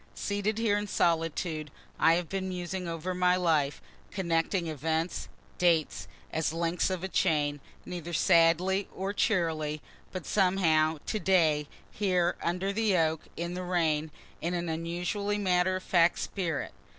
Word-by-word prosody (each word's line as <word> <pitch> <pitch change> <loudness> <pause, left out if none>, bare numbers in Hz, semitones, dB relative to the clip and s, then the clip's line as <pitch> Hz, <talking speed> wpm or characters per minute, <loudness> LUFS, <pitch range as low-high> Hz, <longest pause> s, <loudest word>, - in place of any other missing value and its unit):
Seated 205 +1 -1
here 215 -2 +2
in 205 - -4
solitude 165 -3 0 0.3
I 165 - +5
have 175 -1 -2
been 190 +1 -3
musing 180 0 -4
over 165 +2 -3
my 180 0 +3
life 160 -6 +1 0.3
connecting 170 -1 0
events, 160 +2 -2 0.3
dates, 170 -3 +2 0.3
as 160 0 0
links 170 +2 0
of 185 -1 -3
a - - -1
chain, 145 -5 +1 0.3
neither 175 -1 -6
sadly 170 +3 +3
nor 195 +1 -2
cheerily, 160 -7 0 0.3
but 185 -3 -6
somehow, 165 -5 +2
to 215 - -2
day 160 -6 +3 0.2
here 180 -4 +1
under 180 +3 -1
the 210 -3 +2
oak, 160 -1 +1 0.2
in 170 +1 -3
the 180 - -4
rain, 160 -4 0 0.3
in 175 +2 -1
an 170 -1 -2
unusually 175 +5 -2
matter 185 -2 +2
of 185 - -4
fact 175 -1 +3
spirit. 170 -6 -3
175 Hz, 145 wpm, -29 LUFS, 160-185 Hz, 0.3 s, I